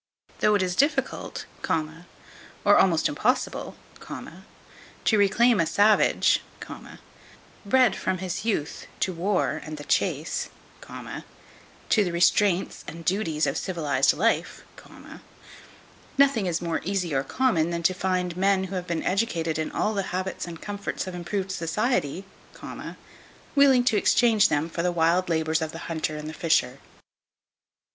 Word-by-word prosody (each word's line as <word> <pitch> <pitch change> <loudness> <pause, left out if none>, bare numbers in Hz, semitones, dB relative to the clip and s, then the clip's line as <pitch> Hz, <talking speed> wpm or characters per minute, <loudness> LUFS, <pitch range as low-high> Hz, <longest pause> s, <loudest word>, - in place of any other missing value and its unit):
Though 210 0 +3
it 200 - +2
is 180 -1 -2
difficult, 280 - 0 1.2
or - - +7
almost - - +4
impossible, - - -1 0.2
to 220 - -6
reclaim 215 +2 +4
a 165 - +2
savage, 205 +4 +3 1.2
bred 245 0 +3
from 185 0 -2
his 185 -1 -4
youth 200 -10 -2
to 185 - 0
war 175 -3 0
and 155 0 -7
the 145 - -8
chase, - - -1 0.4
to 215 - -4
the 180 - -2
restraints 175 +2 +2
and 165 - -8
the - - -12
duties 165 -5 0
of - - -1
civilized 145 -7 +1
life, 225 +7 0 1.5
nothing 270 -8 +3
is 170 0 -1
more 165 -1 -1
easy 180 -3 -2
or 135 0 +1
common 180 - +1
than 170 0 -3
to 185 - +3
find 185 -2 -1
men 190 +1 +2
who 190 0 -5
have 180 0 -5
been 170 -2 -2
educated 170 -6 0
in 155 - -2
all 215 - 0
the 200 - 0
habits 185 0 -3
and 165 -1 -9
comforts 205 -1 -4
of 185 - -6
improved 185 +2 -3
society, 185 - -1 1.3
willing 275 -3 +5
to 235 -3 +2
exchange 220 -1 +4
them 150 +2 0
for 170 0 -4
the 180 +1 +1
wild 175 +2 +2
labours 160 -1 +1
of 160 -1 -3
the 165 - -8
hunter 160 -2 -3
and 150 0 -7
the 155 - -6
fisher. 140 -7 +1
185 Hz, 140 wpm, -25 LUFS, 165-205 Hz, 1.5 s, or